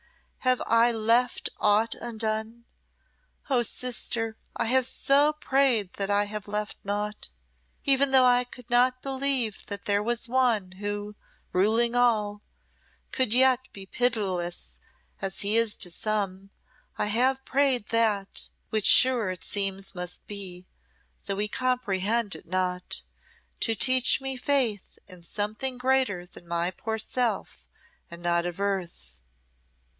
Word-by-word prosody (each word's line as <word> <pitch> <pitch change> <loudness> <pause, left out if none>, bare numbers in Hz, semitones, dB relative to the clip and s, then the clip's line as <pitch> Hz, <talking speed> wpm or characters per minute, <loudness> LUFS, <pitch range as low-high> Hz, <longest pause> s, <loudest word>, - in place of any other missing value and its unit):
Have 255 -1 +1
I 230 +1 +4
left 230 +2 +1
aught 215 +2 +3
undone? 225 0 -4 0.9
Oh, 250 -2 +3
sister, 235 -2 -1 0.2
I - - -1
have 255 +2 +3
so 285 +3 +3
prayed 265 -9 +1
that 195 0 -3
I 205 0 +2 0.2
left 210 0 -3
naught. 205 +1 -3 0.6
Even 275 0 +4
though 260 -1 +5
I 245 0 +4
could 245 -1 -13
not 250 +1 +3
believe 265 -5 0
that 200 -1 -5
there 205 0 +1
was 235 +2 -1
One 235 -7 +1
who, 205 +1 -5 0.4
ruling 225 +5 +2
all, 215 -4 +1 0.7
could 260 -5 0
yet 255 +1 +5
be 195 -1 -10
pitiless 190 -7 -2 0.4
as 195 -2 -3
He 205 +2 +2
is 230 -2 +3
to 180 - -1
some, 195 0 -2 0.5
I - - 0
have 260 +5 +1
prayed 270 -5 +1
That 215 -4 0 0.2
which 215 -2 +1
sure 250 -6 +6
it 185 -2 -6
seems 195 -1 -1
must 180 -1 -5
be, 185 -3 -7 0.6
though 200 - -2
we 205 +2 -1
comprehend 225 -4 0
it 160 - -12
not 180 0 -2 0.6
to 225 - +1
teach 255 +3 +3
me 270 0 -4
faith 250 -6 0
in 180 -3 -11
something 215 +8 -3
greater 250 -8 +1
than 175 -1 -16
my 170 +1 -1
poor 220 +3 -4
self, 235 +2 -2 0.4
and 170 0 -11
not 170 0 +1
of 175 +1 -6
earth. 175 - -3
220 Hz, 135 wpm, -27 LUFS, 195-250 Hz, 0.9 s, sure